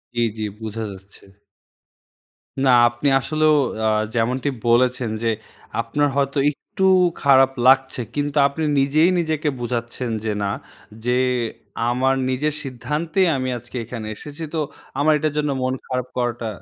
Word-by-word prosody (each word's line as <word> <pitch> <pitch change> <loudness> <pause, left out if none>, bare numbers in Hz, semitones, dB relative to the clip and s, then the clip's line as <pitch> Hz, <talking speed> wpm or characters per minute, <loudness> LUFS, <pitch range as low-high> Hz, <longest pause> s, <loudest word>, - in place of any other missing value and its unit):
জি, 120 - +1 0.2
জি 110 - -3 0.2
বুঝা 110 0 -5
যাচ্ছে। 95 +1 -14 1.4
না, 130 - +4 0.2
আপনি 120 +4 -3
আসলেও 155 +3 +2 0.3
আ - - +4 0.3
যেমনটি 125 +5 0 0.2
বলেছেন, 125 0 +3
যে 115 - +2 0.5
আপনার 145 +6 0
হয়তো 140 0 0
একটু 190 +6 -3 0.4
খারাপ 135 -1 +6 0.2
লাগছে, 130 -1 +4
কিন্তু 145 0 -1
আপনি 150 +3 -4 0.2
নিজেই 155 +6 +4
নিজেকে 155 -2 0
বোঝাচ্ছেন, 120 0 -3 0.2
যে 110 - 0
না, 100 - 0 0.5
যে 125 0 +2 0.7
আমার 130 +2 +2
নিজের 145 +4 0
সিদ্ধান্তেই 155 +7 -1
আমি 130 0 -2
আজকে 120 +2 -9
এখানে 115 -2 -6
এসেছি, 150 +7 -9
তো 160 - 0 0.4
আমার 155 +2 +4
এটার 150 0 -1
জন্য 150 -1 +1
মন 130 0 0
খারাপ 125 -1 -2
করাটা 120 -2 -1
130 Hz, 135 wpm, -21 LUFS, 120-150 Hz, 1.4 s, খারাপ